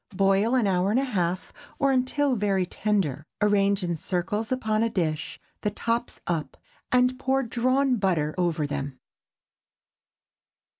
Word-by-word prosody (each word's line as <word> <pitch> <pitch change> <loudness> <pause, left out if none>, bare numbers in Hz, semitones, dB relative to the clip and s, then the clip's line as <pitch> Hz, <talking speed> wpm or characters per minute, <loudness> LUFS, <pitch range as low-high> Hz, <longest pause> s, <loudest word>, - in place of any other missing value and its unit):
Boil 195 +5 +3
an 245 -4 +3
hour 185 -1 +2
and 225 +5 +3
a - - +1
half, 185 -8 -2 0.2
or 275 -1 +2
until 265 +1 +1
very 195 -3 +1
tender. 180 -8 -1 0.2
Arrange 200 -1 +2
in 170 -1 -1
circles 190 - -2
upon 220 -4 0
a 230 - +2
dish, 160 -6 -2 0.2
the 210 - +1
tops 230 +3 -2
up, 165 -3 -3 0.3
and 250 +1 +3
pour 270 0 +1
drawn 255 +2 +1
butter 170 -7 +1
over 170 -4 0
them. 140 -2 -4
205 Hz, 140 wpm, -26 LUFS, 180-250 Hz, 0.3 s, Boil